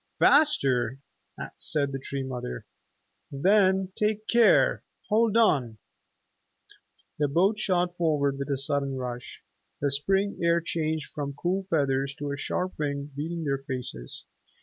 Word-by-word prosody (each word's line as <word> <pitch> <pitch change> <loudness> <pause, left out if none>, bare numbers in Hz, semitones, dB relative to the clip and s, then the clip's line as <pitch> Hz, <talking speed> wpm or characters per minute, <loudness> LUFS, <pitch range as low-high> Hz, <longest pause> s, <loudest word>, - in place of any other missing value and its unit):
"Faster?" 135 - +3 0.6
said 145 -3 0
the 135 - -4
Tree 135 +1 -4
Mother. 125 - -5 0.7
"Then 190 +5 +3
take 215 0 0
care! 235 0 +4 0.3
Hold 225 0 +3
on!" 135 - +2 1.4
The 145 - +2
boat 190 +9 +2
shot 180 -3 0
forward 145 -4 +1
with 140 +1 -4
a 140 - 0
sudden 140 0 -1
rush. 125 -1 -6 0.4
The 140 -1 0
spring 195 +8 +1
air 170 0 +3
changed 160 -3 -3
from 140 -1 -4
cool 185 +5 -2
feathers 140 -3 0
to 145 0 -4
a - - -2
sharp 180 +6 -3
wing 140 -1 -3
beating 165 +3 -4
their 140 -2 -1
faces. 125 - -6
145 Hz, 130 wpm, -27 LUFS, 140-185 Hz, 1.4 s, care